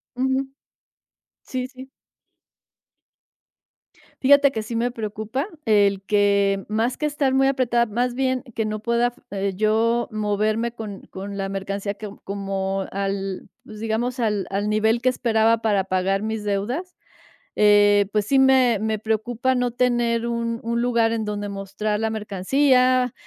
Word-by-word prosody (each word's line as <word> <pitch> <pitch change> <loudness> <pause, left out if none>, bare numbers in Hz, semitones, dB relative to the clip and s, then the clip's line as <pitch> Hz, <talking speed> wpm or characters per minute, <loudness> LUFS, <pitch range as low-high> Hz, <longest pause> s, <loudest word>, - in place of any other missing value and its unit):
Ujú. 265 +1 0 1.0
Sí, 255 -1 -4
sí. 260 0 -12 2.3
Fíjate 280 +1 +6
que 220 -4 -3
sí 230 +2 -6
me 235 +2 +1
preocupa 220 - -4 0.2
el 200 -3 +3
que, 200 -1 +2
más 225 +4 0
que 300 - -2
estar 285 -3 0
muy 270 0 +4
apretada, 245 -3 +2
más 240 +3 -1
bien 260 -1 0
que 220 - 0
no 215 0 -3
pueda, 235 +2 +1 0.2
eh, 200 0 -2
yo 225 +3 +1
moverme 215 +2 0
con 215 -4 -7
con 200 +1 -6
la 195 0 -3
mercancía 195 +1 -3
que 205 +1 -8
como 195 -1 -3
al, 195 -1 -3 0.2
pues 215 -1 -11
digamos 230 +3 -2
al 210 -4 0
al 200 +2 -1
nivel 220 +2 +2
que 255 - +4
esperaba 230 -2 +2
para 205 -4 +2
pagar 190 +1 0
mis 220 -1 -3
deudas, 235 - -3 0.6
eh, 205 -1 +5
pues, 210 -1 +1
sí, 270 +5 +3
me 260 -4 +5
me 220 0 -1
preocupa 225 +4 -1
no 250 -1 0
tener 240 -1 +1
un 235 0 -2
un 235 +1 -1
lugar 235 -2 +2
en 225 -1 -2
donde 205 -1 -3
mostrar 200 +2 -3
la 225 - 0
mercancía, 250 +5 +2
220 Hz, 145 wpm, -23 LUFS, 205-245 Hz, 2.3 s, Fíjate